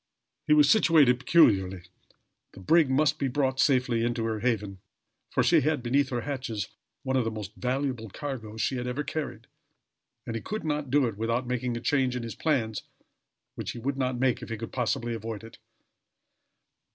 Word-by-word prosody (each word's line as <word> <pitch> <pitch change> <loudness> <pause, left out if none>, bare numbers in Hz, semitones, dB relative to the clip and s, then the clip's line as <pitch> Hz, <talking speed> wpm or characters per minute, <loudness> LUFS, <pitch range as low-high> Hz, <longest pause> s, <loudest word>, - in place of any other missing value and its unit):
He 150 - +5
was 150 -1 +6
situated 150 - +5
peculiarly. 95 - +3 0.7
The - - -12
brig 160 - +4
must 140 +1 +2
be 135 - 0
brought 130 0 0
safely 125 -4 +2
into 120 -1 -1
her 110 -1 -2
haven, 105 -5 -1 0.5
for - - +1
she 165 -3 +4
had 150 -2 0
beneath 135 +3 +2
her 120 -2 -2
hatches 120 -7 -4 0.3
one 130 - -1
of 130 - +3
the 115 - -1
most 105 -3 -7
valuable 125 -2 -2
cargoes 110 -4 -6
she 130 - 0
had 125 0 -3
ever 130 +4 -2
carried 155 0 -5 0.8
and 115 - -4
he 115 - -3
could 215 +1 -5
not 150 -2 -2
do 140 +1 +3
it 110 -4 -3
without 115 +3 -1
making 125 -1 -2
a - - -6
change 130 -1 +1
in 125 - -3
his 115 - -5
plans 115 -9 -1 0.7
which - - -5
he - - -9
would 135 +4 -2
not 130 -2 -1
make 130 -1 +1
if - - -8
he 115 - -3
could 115 +1 -7
possibly 120 -1 -1
avoid 110 -1 -5
it. 115 - -13
125 Hz, 190 wpm, -27 LUFS, 115-140 Hz, 0.8 s, was